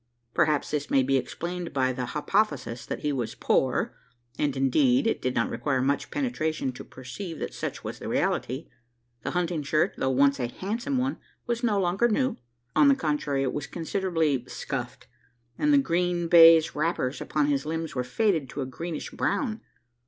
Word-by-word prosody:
Perhaps 150 -2 +2
this 145 -1 -2
may 135 - +4
be 135 +1 +1
explained 175 +6 -3
by 130 -2 +1
the 125 -1 -3
hypothesis 145 - -1
that - - -4
he 150 -1 0
was 120 -5 -3
poor, - - +1 0.4
and, 145 -2 -1
indeed, 250 - +3
it 225 - 0
did 130 0 -1
not 115 - +1
require 140 -3 0
much 140 +2 0
penetration 160 - -1
to 125 - -9
perceive 160 +7 -8
that - - -5
such - - -5
was - - -6
the - - -6
reality. 130 +6 -1 0.5
The - - -3
hunting 170 -3 0
shirt, 155 +2 +1
though 130 - 0
once 140 +1 +3
a 120 - 0
handsome 230 - -3
one, 260 +2 -1 0.3
was 235 0 -2
no 210 -4 +2
longer 190 +5 +2
new. 255 +3 0 0.4
On 290 - +6
the 275 - +6
contrary, 150 - -1
it 130 - -1
was 145 -1 -4
considerably 165 -5 0
"scuffed;" - - -5 0.5
and 300 - +3
the 290 - +6
green 175 -7 +1
baize 165 -1 +8
wrappers 150 -4 -1
upon 150 -1 0
his 140 -1 +1
limbs 160 0 -3
were 125 - -1
faded 165 - 0
to 140 - -5
a - - -1
greenish 160 +5 -5
brown. 230 -6 -1
155 Hz, 180 wpm, -27 LUFS, 135-195 Hz, 0.5 s, baize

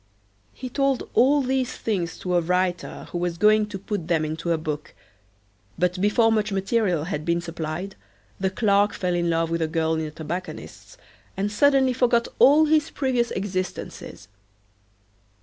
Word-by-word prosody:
He 255 - -7
told 275 0 0
all 280 +3 +4
these 260 -1 -1
things 180 -7 -2
to 180 - -2
a 175 - +3
writer 180 +1 -1
who 175 - -3
was 175 -1 -2
going 215 +2 +4
to 205 -2 -6
put 195 -3 -4
them 165 -3 +1
into 160 +2 -3
a 165 - +2
book, 155 -1 -5 0.8
but 180 +1 0
before 225 +3 +3
much 215 -1 +1
material 195 -4 0
had 155 -3 -4
been 170 +1 +1
supplied 170 +2 -5 0.4
the 190 0 +1
clerk 200 +1 +2
fell 180 -1 -2
in 170 -1 0
love 165 0 0
with 165 0 -1
a 160 - +1
girl 160 0 0
in 160 - -1
a - - -6
tobacconist's 165 +4 -7 0.4
and 200 +2 -1
suddenly 265 +3 +3
forgot 240 -2 +2
all 300 +3 +7
his 305 -1 +2
previous 250 -4 0
existences. 185 - -5
190 Hz, 165 wpm, -24 LUFS, 170-230 Hz, 0.8 s, all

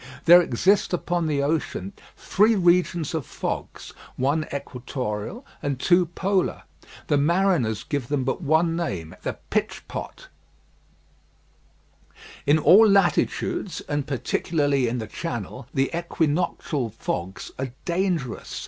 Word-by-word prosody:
There 175 +1 +9
exist 185 - +2
upon 175 -1 0
the 145 -2 0
ocean 140 - -2 0.2
three 215 +3 +3
regions 175 -4 +2
of 160 -3 -1
fogs, - - -5 0.2
one 145 +4 0
equatorial 130 - -5 0.2
and 140 -3 -2
two 175 +2 +4
polar. 190 +2 -1 0.4
The 145 - +2
mariners 155 - +2
give 140 -5 -3
them 140 -1 0
but 135 +7 -2
one 165 +2 +2
name, 95 - -4
the - - -4
pitch - - -1
pot. - - -7 2.2
In 145 +2 +5
all 195 +8 +7
latitudes, 195 0 +1
and 145 -1 -3
particularly 140 0 0
in 120 +2 -1
the 110 - -4
Channel, - - -6
the 135 0 0
equinoctial 160 -5 -1
fogs 95 -3 -5
are 135 0 -2 0.2
dangerous. 170 - -2
155 Hz, 120 wpm, -24 LUFS, 130-175 Hz, 2.2 s, There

